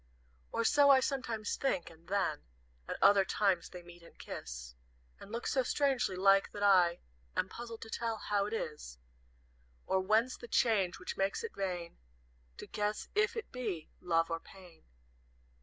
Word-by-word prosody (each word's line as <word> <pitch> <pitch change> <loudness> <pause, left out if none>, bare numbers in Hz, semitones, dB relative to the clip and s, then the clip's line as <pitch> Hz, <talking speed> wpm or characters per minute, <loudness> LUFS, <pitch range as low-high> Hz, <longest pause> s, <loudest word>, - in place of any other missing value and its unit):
"Or 230 - 0
so 285 +4 +5
I 270 -1 +8
sometimes 235 -6 -2
think; 190 -12 -1
and 165 +1 -19
then, 185 -6 0 0.5
At - - -4
other 200 -1 +7
times, 190 -2 +1
they 180 -1 -10
meet 175 0 -14
and 170 - -17
kiss, - - -7 0.5
And 205 - -12
look 235 +1 -4
so 265 - +2
strangely 255 -5 +1
like, 195 +1 +4
that 205 - -4
I 180 -4 +5 0.3
Am - - +1
puzzled 230 -1 -7
to 225 - -10
tell 230 -1 -2
how 205 -1 0
it 210 - -5
is, 150 - -5 0.9
Or 190 - +2
whence 220 +6 +2
the 240 - -10
change 205 -6 +2
which - - -6
makes 195 - 0
it 455 - -5
vain 180 -3 -4 0.6
To - - -7
guess 210 0 -2
if 420 +1 +2
it 450 - -5
be 225 -11 -4
Love 165 -2 +1
or 165 - -1
Pain. 180 -2 -16
200 Hz, 170 wpm, -33 LUFS, 175-235 Hz, 0.9 s, I